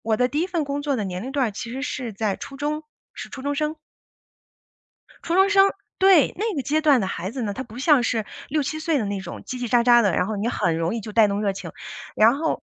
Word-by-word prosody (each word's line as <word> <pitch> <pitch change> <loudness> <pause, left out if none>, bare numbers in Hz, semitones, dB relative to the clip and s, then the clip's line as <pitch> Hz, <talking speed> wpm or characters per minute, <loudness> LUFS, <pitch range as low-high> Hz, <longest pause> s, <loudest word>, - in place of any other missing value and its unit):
我 220 -1 0
的 250 - +3
第 290 +4 -2
1 350 - +1
份 345 -4 -1
工 280 0 -3
作 285 -2 -1
的 210 - -2
年 180 0 -4
龄 260 - -5
段 265 -5 +1
儿 - - -5
其 225 +3 -7
实 265 +2 -5
是 245 -6 -4
在 205 -1 -1
初 275 - -9
中， 300 +2 -2 0.3
是 - - -8
初 265 - -9
中 285 0 -1
生。 305 +2 -1 1.5
初 335 - -1
中 - - +3
生， 385 - +8 0.6
对， 380 -6 +5
那 425 0 -1
个 275 - -2
阶 305 +4 +1
段 290 -5 +4
的 190 - -1
孩 185 +1 -4
子 255 0 -5
呢， 205 - -2
他 260 - -4
不 235 -1 -11
像 285 -1 +4
是 225 -2 0 0.2
6-7 310 0 -1
岁 315 -2 0
的 220 - -1
那 200 -1 -3
种 185 - -8
叽 - - -6
叽 245 -2 -4
喳 240 0 +3
喳 240 -1 +6
的， 200 -5 +2
然 180 - +1
后 215 0 -3
你 215 +4 -1
很 165 -8 0
容 165 +6 -1
易 230 - -3
就 215 0 -8
带 220 -1 +5
动 200 +1 -1
热 200 - +1
情。 195 - -8 0.4
然 225 +5 +5
后 320 +2 -2
250 Hz, 275 characters per minute, -23 LUFS, 215-295 Hz, 1.5 s, 生